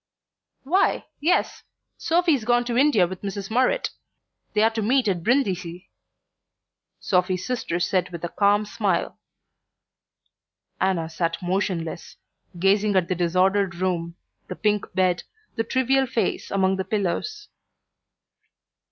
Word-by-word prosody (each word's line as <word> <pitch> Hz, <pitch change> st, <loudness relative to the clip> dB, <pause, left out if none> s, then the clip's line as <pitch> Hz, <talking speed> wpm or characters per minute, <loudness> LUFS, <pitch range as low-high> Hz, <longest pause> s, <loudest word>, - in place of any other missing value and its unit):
"Why, 355 Hz, +9 st, +1 dB
yes. 330 Hz, +5 st, +1 dB, 0.3 s
Sophy's 330 Hz, -6 st, +1 dB
gone 240 Hz, +1 st, +2 dB
to 240 Hz, -1 st, -2 dB
India 255 Hz, -8 st, +4 dB
with 185 Hz, +1 st, -7 dB
Mrs. 200 Hz, 0 st, -5 dB
Murrett; 260 Hz, -, +1 dB, 0.6 s
they're 220 Hz, +2 st, +4 dB
to 225 Hz, 0 st, -3 dB
meet 245 Hz, +3 st, +2 dB
at 185 Hz, -4 st, 0 dB
Brindisi," 185 Hz, -6 st, -1 dB, 1.1 s
Sophy's 180 Hz, -1 st, 0 dB
sister 240 Hz, -9 st, -2 dB
said 180 Hz, 0 st, 0 dB
with 170 Hz, -1 st, -8 dB
a 175 Hz, -, -2 dB
calm 205 Hz, +2 st, +2 dB
smile. 210 Hz, -, -1 dB, 1.6 s
Anna 180 Hz, -4 st, +1 dB
sat 165 Hz, +1 st, -2 dB
motionless, 175 Hz, -3 st, -2 dB, 0.4 s
gazing 200 Hz, +3 st, +2 dB
at 180 Hz, -2 st, +2 dB
the -, -, +2 dB
disordered 185 Hz, +2 st, +1 dB
room, 170 Hz, -2 st, -2 dB, 0.3 s
the -, -, -6 dB
pink 210 Hz, -1 st, 0 dB
bed, 185 Hz, -1 st, +2 dB, 0.3 s
the 225 Hz, -, 0 dB
trivial 260 Hz, +3 st, +1 dB
face 225 Hz, -5 st, -1 dB
among 190 Hz, -1 st, +1 dB
the 190 Hz, -, -1 dB
pillows. 215 Hz, -, -2 dB
195 Hz, 120 wpm, -24 LUFS, 180-240 Hz, 1.6 s, India